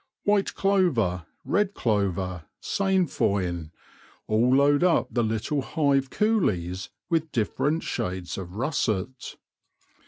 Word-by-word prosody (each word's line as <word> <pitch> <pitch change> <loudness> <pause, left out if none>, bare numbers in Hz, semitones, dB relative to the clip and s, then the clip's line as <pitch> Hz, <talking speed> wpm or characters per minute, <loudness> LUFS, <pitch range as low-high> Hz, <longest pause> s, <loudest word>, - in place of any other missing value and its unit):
White 205 -1 +1
clover, 130 - +1 0.2
red 205 0 +1
clover, 95 -6 -1
sainfoin, 100 - 0 0.6
all 120 +4 +3
load 145 +3 +4
up 180 -2 +3
the 120 - +1
little 110 +6 -1
hive 140 -2 +1
coolies 100 - 0 0.2
with 160 -2 0
dif 110 -3 -1
ferent 155 +3 0
shades 95 -6 -3
of 90 -1 -7
russet. 120 -3 -2
125 Hz, 105 wpm, -26 LUFS, -, 0.6 s, load